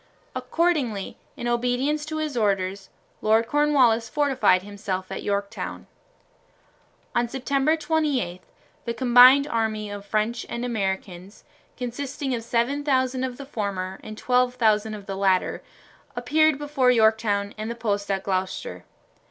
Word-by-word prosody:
Accordingly, 290 - -1 0.2
in 240 - -4
obedience 250 +5 0
to 310 0 -4
his 310 -3 -3
orders, 195 -3 -1 0.3
Lord 220 +1 +3
Cornwallis 255 -5 +3
fortified 270 -11 +2
himself 195 -2 -5
at 195 - -4
Yorktown. 200 0 -3 1.3
On 240 0 +1
September 275 +4 +1
28 295 - -1 0.4
the 235 - -3
combined 255 +3 +7
army 220 -5 -2
of 205 -1 -7
French 215 +3 -1
and 235 +1 -3
Americans, 190 -4 -4 0.3
consisting 265 +2 -4
of 235 - -2
7000 260 +2 0
of 255 -1 -3
the 280 - -8
former 195 -7 -4
and 215 0 -8
12,000 235 -4 +2
of 205 -2 -10
the 195 - -5
latter, 190 -1 +1 0.5
appeared 300 +5 +2
before 290 -3 +1
Yorktown 220 -3 +2
and 215 +1 -5
the 235 - -4
post 205 -3 -2
at 195 -1 -1
Gloucester. 190 - -3
235 Hz, 125 wpm, -24 LUFS, 205-270 Hz, 1.3 s, combined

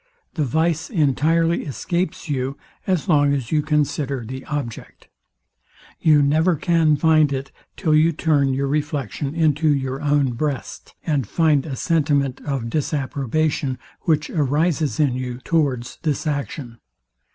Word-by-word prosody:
The 155 - -1
vice 160 +4 0
entirely 165 - +2
escapes 170 +6 -3
you, 135 -2 -2 0.3
as 185 -3 0
long 145 -4 +4
as 130 -5 -4
you 155 -1 +3
consider 145 -4 -1
the 130 +3 -7
object. 140 -7 -6 0.9
You 150 -2 +5
never 160 +5 +3
can 160 -1 +2
find 155 -1 +4
it, 135 0 -4 0.3
till 160 -6 +1
you 155 +2 +5
turn 145 -4 +1
your 135 +1 0
reflection 145 -1 -2
into 155 -1 +2
your 135 -1 -1
own 145 -3 +2
breast, 140 +3 -4
and 140 -8 0
find 155 -4 +2
a 135 - -4
sentiment 145 -4 0
of 135 -5 -2
disapprobation, 140 -1 -1 0.3
which 155 -2 +1
arises 155 +1 0
in 145 -5 +3
you, 125 -1 -4
towards 135 -7 -1
this 155 0 -1
action. 140 -5 -4
145 Hz, 135 wpm, -21 LUFS, 135-155 Hz, 0.9 s, You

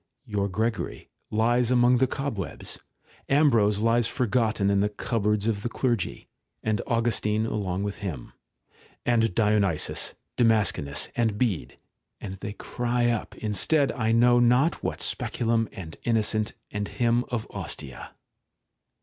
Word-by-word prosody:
Your 100 -1 -1
Gregory 110 +4 -2 0.2
lies 120 +2 +2
among 125 0 +4
the 130 - +4
cobwebs.; 130 - -4 0.5
Ambrose 115 -8 +4
lies 115 +1 +3
forgofen 110 -4 +1
in 100 0 +3
tneimpboards 105 0 0
of 105 -3 0
the 120 - -2
clergy, 120 -6 -1 0.4
and 110 -1 0
Augustine 110 -2 +1
along 100 -4 -2
with 100 0 -4
him; 85 - -6 0.7
and 115 -5 +2
Dionysius, 105 -7 +1 0.2
ITamascenus, 105 - +2
and 110 -3 +1
Bede; 100 - -1 0.4
and 95 - -6
they 100 - -5
cry 120 +1 0
up 115 - -3
instead 130 - +1
I 115 -3 0
know 120 +1 +5
not 125 +7 +3
what - - -2
Speculum, 115 -1 0
and 80 -4 -8
Innocent, 110 -2 +1 0.2
and 105 -1 -2
him 120 0 +1
of 120 -3 -2
Ostia. 65 -3 -6
110 Hz, 125 wpm, -26 LUFS, 105-120 Hz, 0.7 s, know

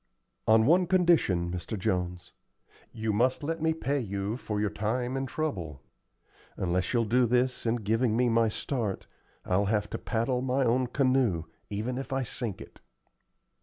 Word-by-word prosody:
"On 110 0 +6
one 175 +6 +4
condition, 165 - +3
Mr. 90 +5 -4
Jones. 90 -3 -2 0.6
You 110 -1 -2
must 125 +6 +1
let 165 +2 -2
me 160 0 +2
pay 145 -3 -1
you 100 -2 -3
for 105 -4 -4
your 105 -1 0
time 120 +4 -2
and 135 0 -2
trouble. 95 - -3 0.8
Unless 90 0 0
you'll 120 -2 +2
do 120 +3 +3
this 125 +1 +1
in 115 - +2
giving 115 +1 +1
me 125 0 +3
my 115 -1 +3
start, 110 -3 -3 0.4
I'll 95 +3 +2
have 105 0 0
to - - -3
paddle 120 +2 -1
my 130 +1 +1
own 125 +2 +2
canoe, 130 - +2 0.3
even 115 +5 -3
if 135 - -7
I 135 0 0
sink 115 -3 -4
it." - - -13
115 Hz, 165 wpm, -29 LUFS, 105-130 Hz, 0.8 s, On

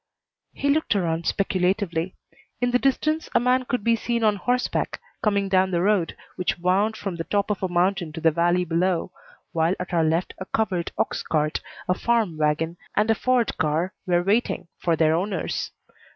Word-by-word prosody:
He 280 0 +1
looked 310 -6 +1
around 170 -3 0
speculatively. 185 -2 0 0.4
In 245 0 +1
the 250 - +3
distance 310 +4 0
a - - +7
man 250 +1 +2
could 245 -3 -2
be 230 +1 +4
seen 235 0 -1
on 210 -1 +4
horseback 250 +5 -1 0.2
coming 200 -2 +1
down 190 0 +3
the 175 -1 0
road 195 -5 +1 0.2
which 180 - 0
wound 195 +5 +1
from 195 -5 -4
the 165 - -2
top 205 +3 0
of 205 - -2
a 190 - +1
mountain 175 -1 +1
to 165 - -5
the 165 0 +4
valley 175 +2 +2
below, 175 +1 0 0.4
while 165 +2 +1
at 180 0 -5
our 165 -1 +3
left 165 +3 0
a 185 - -5
covered 185 -6 -1
ox - - 0
cart, 155 -1 0 0.3
a 180 - +3
farm 220 -3 +1
wagon, 155 +2 0 0.2
and 215 +2 +3
a - - +6
Ford 250 +1 +1
car 160 +4 0
were 175 -1 +2
waiting 200 -3 0
for 170 -2 +1
their 160 0 +3
owners. 185 +2 -2
185 Hz, 185 wpm, -24 LUFS, 170-215 Hz, 0.4 s, a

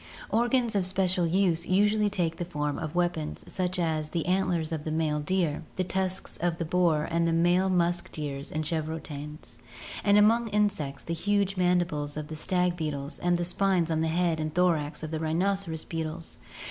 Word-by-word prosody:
Organs 240 +1 +2
of 195 -3 +3
special 185 -2 +2
use 170 -1 +1
usually 210 +2 +3
take 175 -5 -1
the 175 - -3
form 150 -4 -2
of 155 +1 -5
weapons 175 -3 -1
such 185 -1 -1
as 160 -3 -1
the 165 -1 -2
antlers 180 -3 0
of 155 -2 -3
the 155 - -4
male 155 -1 0
deer, 170 -1 0
the 185 - 0
tusks 185 0 -1
of 170 -1 -1
the 170 - -2
boar 165 -2 +2
and 170 0 +2
the - - +2
male 175 +3 +3
musk 175 -1 +1
deer 145 -3 -4
and 155 +1 -2
chevrotains, 155 -1 -4 0.4
and 205 0 +5
among 225 +3 +4
insects 205 -10 0
the 170 - -3
huge 200 +2 0
mandibles 175 -5 0
of 150 -1 -5
the 155 - -5
stag 180 +2 +1
beetles 150 -3 -4
and 175 0 +2
the 175 - -1
spines 180 -2 +1
on 160 0 +1
the 160 - +1
head 165 0 +1
and 155 -1 -3
thorax 165 -4 +1
of 155 - -5
the 160 - -2
rhinoceros 165 +1 -1
beetles. 160 0 -5
170 Hz, 185 wpm, -28 LUFS, 155-185 Hz, 0.4 s, and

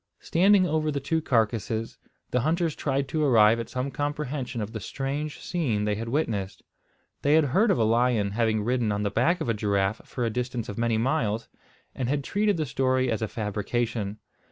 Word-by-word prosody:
Standing 190 +2 +4
over 155 -2 0
the 145 -1 -1
two 160 +4 -1
carcasses, 115 -3 0 0.3
the 125 - +2
hunters 160 +4 0
tried 140 -1 -1
to 155 +2 0
arrive 115 -4 +5
at 115 - -5
some 130 +2 -3
comprehension 145 -2 -3
of 105 0 -4
the 110 - -4
strange 140 +7 -4
scene 120 -12 -1
they 105 - +1
had 115 +3 -4
witnessed. 110 -9 -2 0.6
They 145 +2 +4
had 160 - +5
heard 215 +4 +4
of - - +3
a 115 - +2
lion 115 -2 +2
having 110 -1 +1
ridden 120 -1 +1
on 105 0 -1
the 100 - -1
back 145 - +2
of - - -2
a 115 - +2
giraffe 100 -1 0
for 125 - -3
a 115 - 0
distance 125 0 -3
of 100 - -6
many 115 -1 +1
miles, 115 -3 0 0.4
and 125 -2 -3
had 145 0 0
treated 205 +3 +1
the 155 - 0
story 130 -1 +1
as 110 - -1
a 110 - 0
fabrication. 105 0 -2
120 Hz, 200 wpm, -26 LUFS, 110-145 Hz, 0.6 s, arrive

